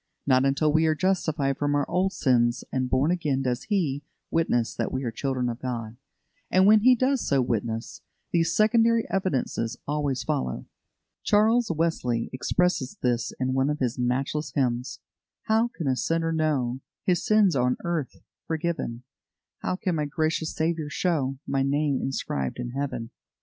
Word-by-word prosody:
Not 130 Hz, -1 st, +4 dB
until 145 Hz, +2 st, +2 dB
we 160 Hz, +1 st, +4 dB
are 155 Hz, -, +2 dB
justified 155 Hz, -6 st, 0 dB
from 145 Hz, 0 st, +1 dB
our 145 Hz, -1 st, +1 dB
old 190 Hz, +2 st, +1 dB
sins 120 Hz, -5 st, +2 dB
and 130 Hz, -1 st, -1 dB
born 135 Hz, +6 st, +2 dB
again 150 Hz, -7 st, 0 dB
does 125 Hz, -1 st, -2 dB
He 160 Hz, -10 st, 0 dB, 0.3 s
witness 120 Hz, -8 st, +1 dB
that -, -, -2 dB
we 130 Hz, +1 st, -2 dB
are 120 Hz, -, -2 dB
children 130 Hz, +1 st, -2 dB
of 120 Hz, 0 st, -4 dB
God; 115 Hz, -3 st, -4 dB, 0.5 s
and 185 Hz, +1 st, +4 dB
when 215 Hz, +1 st, +7 dB
He 250 Hz, +4 st, +6 dB
does 260 Hz, +1 st, +1 dB
so 140 Hz, -, +3 dB
witness, 115 Hz, -2 st, -2 dB, 0.3 s
these 165 Hz, -1 st, +1 dB
secondary 230 Hz, +1 st, +3 dB
evidences 130 Hz, -10 st, -1 dB
always 145 Hz, -3 st, -1 dB
follow. 65 Hz, -1 st, -2 dB, 0.6 s
Charles 220 Hz, +3 st, +3 dB
Wesley 155 Hz, -8 st, -1 dB
expresses 160 Hz, 0 st, 0 dB
this 120 Hz, -2 st, 0 dB
in 130 Hz, 0 st, 0 dB
one 135 Hz, +1 st, +2 dB
of 150 Hz, -, -1 dB
his 125 Hz, -3 st, -2 dB
matchless 135 Hz, +5 st, -1 dB
hymns: 125 Hz, -1 st, -1 dB, 0.4 s
"How 220 Hz, +2 st, +2 dB
can 175 Hz, -9 st, -7 dB
a 130 Hz, -, +2 dB
sinner 165 Hz, +4 st, 0 dB
know 140 Hz, -6 st, 0 dB, 0.2 s
His 180 Hz, -2 st, +2 dB
sins 215 Hz, -5 st, +4 dB
on 125 Hz, -1 st, +2 dB
earth 170 Hz, -5 st, -3 dB, 0.2 s
forgiven? 160 Hz, -7 st, -2 dB, 0.6 s
How -, -, -1 dB
can 185 Hz, -1 st, -2 dB
my 150 Hz, -, 0 dB
gracious 155 Hz, +2 st, -1 dB
Saviour 160 Hz, -1 st, -1 dB
show 145 Hz, -6 st, 0 dB
My 135 Hz, -1 st, 0 dB
name 140 Hz, 0 st, +1 dB
inscribed 70 Hz, -, -2 dB
in 125 Hz, -1 st, -4 dB
Heaven? 130 Hz, -4 st, -4 dB
145 Hz, 160 wpm, -26 LUFS, 125-170 Hz, 0.6 s, when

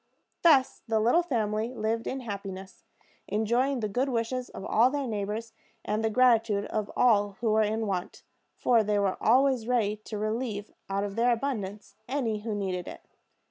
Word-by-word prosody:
Thus 285 Hz, -6 st, +4 dB
the 220 Hz, -1 st, +2 dB
little 240 Hz, +11 st, +4 dB
family 225 Hz, -6 st, -1 dB
lived 225 Hz, +1 st, -1 dB
in 265 Hz, 0 st, -3 dB
happiness, 195 Hz, -4 st, -7 dB, 0.4 s
enjoying 240 Hz, +5 st, +1 dB
the 215 Hz, -, 0 dB
good 250 Hz, +7 st, 0 dB
wishes 245 Hz, +1 st, -2 dB
of -, -, -8 dB
all 235 Hz, +3 st, +4 dB
their 285 Hz, 0 st, -2 dB
neighbors, 220 Hz, 0 st, -4 dB, 0.3 s
and 215 Hz, +2 st, -1 dB
the 220 Hz, -, +2 dB
gratitude 225 Hz, -3 st, +3 dB
of 215 Hz, -2 st, -3 dB
all 205 Hz, -4 st, +4 dB
who 230 Hz, -2 st, +1 dB
were 220 Hz, +1 st, +4 dB
in 220 Hz, +1 st, 0 dB
want; 185 Hz, -3 st, -4 dB, 0.3 s
for 235 Hz, -3 st, +3 dB
they 210 Hz, 0 st, +1 dB
were 200 Hz, -2 st, 0 dB
always 255 Hz, -1 st, +3 dB
ready 220 Hz, -4 st, +1 dB
to 215 Hz, -, -5 dB
relieve 215 Hz, -1 st, -3 dB, 0.2 s
out 195 Hz, +1 st, -1 dB
of 200 Hz, -1 st, -4 dB
their 240 Hz, +1 st, +3 dB
abundance 220 Hz, -5 st, -3 dB
any 240 Hz, -6 st, -1 dB
who 215 Hz, 0 st, -4 dB
needed 185 Hz, -3 st, -3 dB
it. -, -, -9 dB
220 Hz, 175 wpm, -28 LUFS, 205-245 Hz, 0.4 s, Thus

